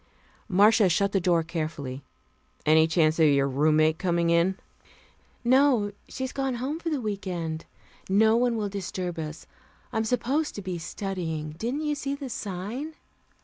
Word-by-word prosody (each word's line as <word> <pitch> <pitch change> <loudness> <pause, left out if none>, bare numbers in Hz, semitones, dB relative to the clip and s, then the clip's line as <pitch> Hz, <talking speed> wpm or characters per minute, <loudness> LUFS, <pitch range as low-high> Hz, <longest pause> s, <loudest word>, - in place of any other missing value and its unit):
Marcia 205 +2 +5
shut 200 +3 +2
the 195 - +2
door 170 -2 +2
carefully. 155 -5 -4 0.6
"Any 160 +1 +5
chance 160 0 +2
of 160 - +6
your 140 -1 +3
roommate 155 +4 +3
coming 170 -2 +1
in?" 170 +3 +3 0.9
"No, 250 -4 +4 0.2
she's 260 -1 -4
gone 270 -2 -2
home 270 +6 -3
for 335 - -3
the 300 -3 -1
week 205 -4 -4
end. 165 -3 -3 0.4
No 220 +3 +5
one 240 0 +2
will 210 -2 -1
disturb 185 -3 -4
us. 155 0 -6 0.5
I'm 220 - +1
supposed 255 +7 0
to 205 - -6
be 185 -2 -4
studying. 165 -4 -4
Didn't 240 - -3
you 300 -1 0
see 280 -1 -3
the 280 -2 -7
sign?" 215 - -5
190 Hz, 155 wpm, -27 LUFS, 160-240 Hz, 0.9 s, of